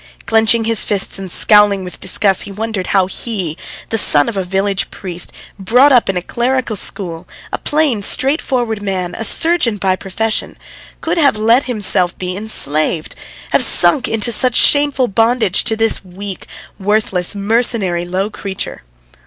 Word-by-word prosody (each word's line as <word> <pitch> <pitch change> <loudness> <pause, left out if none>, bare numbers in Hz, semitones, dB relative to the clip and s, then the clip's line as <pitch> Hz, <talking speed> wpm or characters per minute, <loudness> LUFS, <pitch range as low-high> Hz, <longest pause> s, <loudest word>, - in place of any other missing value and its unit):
Clenching 225 +1 +2
his 225 -1 +2
fists 200 -1 -1
and 190 -1 -7
scowling 205 +1 +3
with 180 - -10
disgust, 190 +1 +1
he - - -4
wondered 210 -2 -5
how 190 -2 +2
he, 190 -4 -4 0.3
the 225 - 0
son 145 -7 +4
of 225 - -4
a 190 - -2
village 195 +1 -2
priest, 180 -2 -4 0.3
brought 250 +9 +3
up 245 -6 +3
in 190 - -1
a 180 - -3
clerical 245 +1 -2
school, 175 -4 -3 0.3
a - - -2
plain, 295 -8 0
straightforward 245 -3 0
man, 185 -3 -3
a - - -5
surgeon 320 -5 +2
by 190 -1 0
profession 215 +4 -3
how - - -32 0.4
could 335 +2 -2
he 330 - +2
have 280 -6 +2
let 230 +5 +2
himself 200 -7 +1
be 180 0 -4
enslaved, 160 -6 0 0.4
have - - +3
sunk 265 -4 +4
into 225 +1 +1
such 250 +2 +1
shameful 285 -3 +3
bondage 225 -1 +1
to 225 - 0
this 225 -2 +1
weak, 190 +1 -9 0.3
worthless, 200 -2 0
mercenary, 200 -4 0
low 185 +4 -3
creature. 195 -2 -6
210 Hz, 160 wpm, -15 LUFS, 190-235 Hz, 0.4 s, son